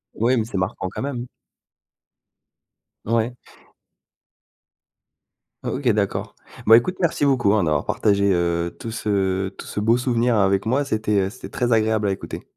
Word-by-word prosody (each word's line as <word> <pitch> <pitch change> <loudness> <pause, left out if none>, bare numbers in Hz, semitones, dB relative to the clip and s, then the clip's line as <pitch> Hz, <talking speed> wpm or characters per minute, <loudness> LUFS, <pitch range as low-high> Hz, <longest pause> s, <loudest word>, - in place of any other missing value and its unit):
Oui, 120 +3 +2
mais 110 - 0
c'est 110 -3 -5
marquant 95 0 -2
quand - - -6
même. 125 -3 -4 1.8
Ouais. 115 +2 0 2.3
O - - -2
OK 130 -2 0
d'accord. 105 -3 -1 0.3
Bon 115 - +8
écoute 150 +11 +2
merci 165 -4 +1
beaucoup 120 -8 +3
hein, 105 -5 +2
d'avoir 75 -2 +1
partagé, 100 -1 +2
heu, 85 -1 0
tout 115 - -6
ce 95 -3 -1
tout - - -11
ce 105 - -3
beau 115 +3 +3
souvenir 120 -2 +1
avec 95 0 +2
moi, 135 +5 +1
c'était, 110 -5 0
heu, - - -4
c'était 120 - -10
très 120 -2 0
agréable 110 -1 +2
à 100 - +1
écouter. 95 - -6
110 Hz, 160 wpm, -22 LUFS, 100-120 Hz, 2.3 s, Bon